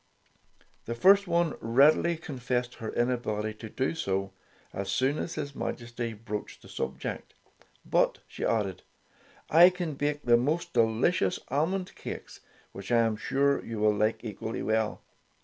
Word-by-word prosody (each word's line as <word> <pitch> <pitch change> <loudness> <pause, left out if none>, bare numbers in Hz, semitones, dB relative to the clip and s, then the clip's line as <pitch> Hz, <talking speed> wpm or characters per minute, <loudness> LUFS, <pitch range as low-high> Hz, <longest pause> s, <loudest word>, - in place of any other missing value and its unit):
The 115 - -3
first 195 +8 +5
one 170 -2 +2
readily 145 +8 +4
confessed 125 -5 -3
her 110 - -3
in 120 +1 +1
ability 110 -3 -2
to 110 - -7
do 130 +7 -1
so, 95 -10 -2 0.4
as 100 +1 -4
soon 135 +4 +1
as 165 - -4
his 140 -1 -4
Majesty 120 -2 -4
broached 105 -1 -7
the - - -14
subject. - - -5 0.5
"But," - - +2
she - - -7
added, 100 -5 0 0.7
"I 170 +3 +9
can 180 -4 -4
bake 145 +1 -2
the 120 -1 +5
most 150 +8 -1
delicious 115 - +2
almond 180 +7 -1
cakes, - - -8 0.3
which 100 +2 -8
I 120 -1 +5
am 115 -1 +1
sure 140 +5 +1
you 115 - -6
will 105 0 +3
like 105 +3 0
equally 110 +1 -4
well." 110 0 0
120 Hz, 150 wpm, -29 LUFS, 110-150 Hz, 0.7 s, I